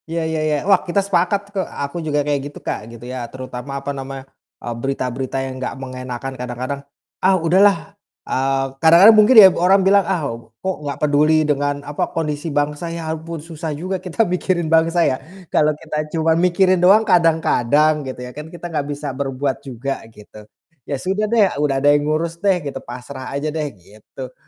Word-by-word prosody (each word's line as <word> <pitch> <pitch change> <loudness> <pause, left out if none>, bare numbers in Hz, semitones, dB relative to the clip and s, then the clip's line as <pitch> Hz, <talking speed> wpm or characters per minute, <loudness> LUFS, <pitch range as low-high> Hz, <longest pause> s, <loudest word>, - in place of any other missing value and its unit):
Ya 165 0 -2
ya 160 -1 -1
ya, 155 -1 +1
wah 195 -2 +4
kita 175 - -4
sepakat 200 +2 0
kok 195 - 0
aku 145 -1 -5
juga 150 -2 -1
kayak 145 -2 0
gitu - - -13
Kak, - - -2
gitu 115 +1 -11
ya, 125 -1 -6
terutama 130 0 -8
apa 140 - -2
namanya, 135 0 -7 0.3
eee, 120 - -5
berita-berita 130 -1 -3
yang 130 0 -7
gak 130 - -4
mengenakkan 130 0 -6
kadang-kadang, 125 +2 -5 0.4
"Ah 190 0 +4
udahlah," 180 +2 +3 0.3
eee, 135 +1 0 0.2
kadang-kadang 170 +7 +8
mungkin 215 +4 +6
ya 205 -3 +12
orang 190 +2 +3
bilang, 200 +1 +5
"Ah 175 -6 0 0.4
kok 190 -1 0
gak 140 - -4
peduli 155 +2 +3
dengan 145 -1 -1
apa, 145 0 -2
kondisi 150 0 -2
bangsa. 145 +3 -1
Ya 165 -1 -4
ampun 160 0 -7
susah 165 -1 -6
juga 185 +3 -4
kita 185 +5 0
mikirin 175 -2 -1
bangsa 165 +1 +3
ya, 130 - 0 0.3
kalau 150 - +4
kita 155 -1 -6 0.2
cuma 160 0 +3
mikirin 180 +2 +3
doang 200 +5 +6
kadang-kadang 155 - +3
gitu 130 -2 -7
ya 125 - -9
kan, 150 +2 -8
kita 175 +1 -10
gak 145 -2 -1
bisa 145 -1 -4
berbuat 135 0 -2
juga" 135 +1 -5
gitu. 105 -1 -15 0.4
"Ya 140 - -1
sudah 195 +8 -1
deh, 225 -2 +4 0.2
udah 140 -2 +1
ada 145 +2 +4
yang 145 0 +1
ngurus 165 +2 -2
deh" 195 -2 +3
gitu, 140 - -4
"pasrah 125 +2 -8
aja 145 +2 -3
deh" 155 -2 -2
gitu. 110 +7 -12
150 Hz, 185 wpm, -20 LUFS, 135-175 Hz, 0.4 s, ya